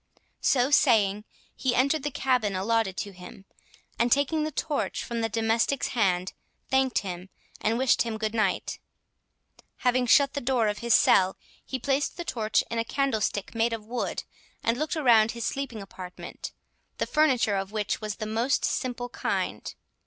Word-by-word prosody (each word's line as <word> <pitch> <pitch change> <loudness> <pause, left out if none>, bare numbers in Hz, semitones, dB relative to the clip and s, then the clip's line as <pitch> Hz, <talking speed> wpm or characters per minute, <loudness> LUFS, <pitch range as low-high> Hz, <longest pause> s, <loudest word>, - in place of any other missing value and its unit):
So 260 +1 +2
saying, 215 -8 +4 0.3
he 255 -2 0
entered 280 +4 +2
the 295 - -2
cabin 250 -7 0
allotted 200 0 0
to 205 - -4
him, 185 +1 -12 0.5
and 235 +1 +2
taking 285 +3 +2
the 310 - -2
torch 295 0 -2
from 235 -1 -3
the 225 - 0
domestic's 225 +4 +1
hand, 185 -6 +1 0.4
thanked 265 -1 +2
him, 180 0 -6 0.3
and 225 +2 0
wished 260 0 +3
him 230 -2 -1
good 215 0 -2
night. 215 -5 0 1.1
Having 250 0 +3
shut 275 +3 +5
the 285 - -3
door 240 -3 +1
of 205 - -3
his 235 -1 +3
cell, 185 0 +4 0.3
he 260 - -4
placed 275 +5 -1
the 345 - -5
torch 220 -6 +1
in 230 - -1
a - - +1
candlestick 225 -6 -1
made 230 0 +1
of 220 -2 -5
wood, 245 +3 -3 0.4
and 230 - +2
looked 305 +6 -2
around 235 -7 +4
his 235 -1 -4
sleeping 250 -7 -3
apartment, 185 -2 -9 0.5
the - - 0
furniture 260 -9 +2
of 195 +1 -4
which 210 0 -2
was 215 -1 -3
of - - -16
the 215 - -4
most 230 +5 +1
simple 245 -1 -2
kind. - - -3
230 Hz, 170 wpm, -27 LUFS, 215-265 Hz, 1.1 s, shut